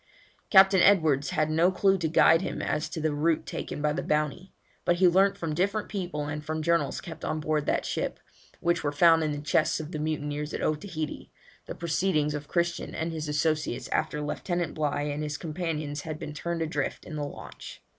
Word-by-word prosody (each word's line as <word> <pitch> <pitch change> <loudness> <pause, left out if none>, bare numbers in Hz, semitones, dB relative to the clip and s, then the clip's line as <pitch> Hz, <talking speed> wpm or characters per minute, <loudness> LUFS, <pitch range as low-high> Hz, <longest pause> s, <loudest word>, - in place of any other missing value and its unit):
Captain 190 -2 +7
Edwards 155 -8 +4
had 155 0 0
no 165 +4 +4
clue 195 +1 +3
to 165 - 0
guide 165 +1 +5
him - - -4
as 150 +1 -1
to 170 - -5
the 155 -1 0
route 155 +2 +1
taken 150 - -5
by 150 0 +2
the 175 - -2
Bounty, 150 +4 -1 0.3
but 175 - +3
he 185 +1 +5
learnt 195 +3 +4
from 165 -5 -3
different 200 +6 0
people 175 -7 -3
and 150 +1 -4
from 155 +1 -3
journals 170 -3 +1
kept 165 -2 -9
on 155 - -1
board 150 -1 -1
that - - +1
ship, - - -2 0.4
which 170 -1 +1
were 145 - 0
found 165 +2 +5
in 155 - 0
the 145 - -3
chests 155 +1 +1
of 155 +1 -6
the 155 - -4
mutineers 150 -1 -3
at - - -4
Otaheite, 155 0 -3 0.4
the - - -5
proceedings 160 -3 0
of 145 -1 -5
Christian 170 0 -1
and 165 +1 -2
his 155 -2 -4
associates 150 -3 -1
after 150 -1 -1
Lieutenant 175 +2 -2
Bligh 145 -1 -1
and 150 - -4
his 150 -1 -3
companions 155 -3 -3
had 155 0 -5
been 150 -1 -7
turned 165 +2 -2
adrift 150 -3 -3
in 155 - -7
the 150 - -2
launch. 145 - -9
155 Hz, 205 wpm, -28 LUFS, 150-170 Hz, 0.4 s, Captain